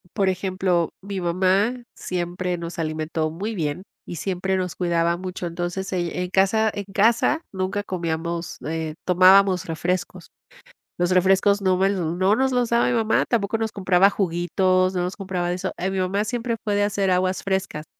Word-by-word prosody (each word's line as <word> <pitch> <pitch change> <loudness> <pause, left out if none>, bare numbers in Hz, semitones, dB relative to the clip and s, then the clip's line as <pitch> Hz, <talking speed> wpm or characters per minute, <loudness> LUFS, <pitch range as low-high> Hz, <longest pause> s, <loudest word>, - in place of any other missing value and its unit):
por 195 -3 +2
ejemplo, 185 -2 0
mi 195 -1 -5
mamá 190 +8 +1
siempre 180 0 -3
nos 170 0 -7
alimentó 155 0 -2
muy 200 +8 -4
bien 155 0 -3 0.2
y - - -7
siempre 190 +3 -1
nos 180 -3 -3
cuidaba 170 -1 +1
mucho. 185 0 -6
Entonces, 175 +3 -4
ell 175 -2 -1
en 180 0 -2
casa 195 +4 +2
en 205 - -5
casa, 235 +10 +3
nunca 190 +1 -2
comíamos, 170 -2 -3
eh, 160 -1 -3
tomábamos 185 0 +5
refrescos. 175 +3 -3 0.7
Los 175 +1 +1
refrescos 190 +2 +3
no 185 -1 +2
me 190 +1 +3
l 200 - 0
no 180 +4 +1
nos 265 +2 +1
los 245 -2 +1
daba 235 0 +3
mi - - +1
mamá, 225 -2 +2
tampoco 225 -2 0
nos 220 -1 -2
compraba 190 -1 +3
juguitos, 185 0 +1
no 180 - 0
nos 180 +1 -3
compraba 185 -3 -3
de 175 - 0
eso. 190 +1 -3
Eh, 185 - -1
mi 190 - -2
mamá 190 +3 0
siempre 235 +1 -2
puede 205 -1 +1
hacer 200 -2 0
aguas 185 +1 0
frescas. 190 -5 -2
185 Hz, 175 wpm, -23 LUFS, 175-200 Hz, 0.7 s, tomábamos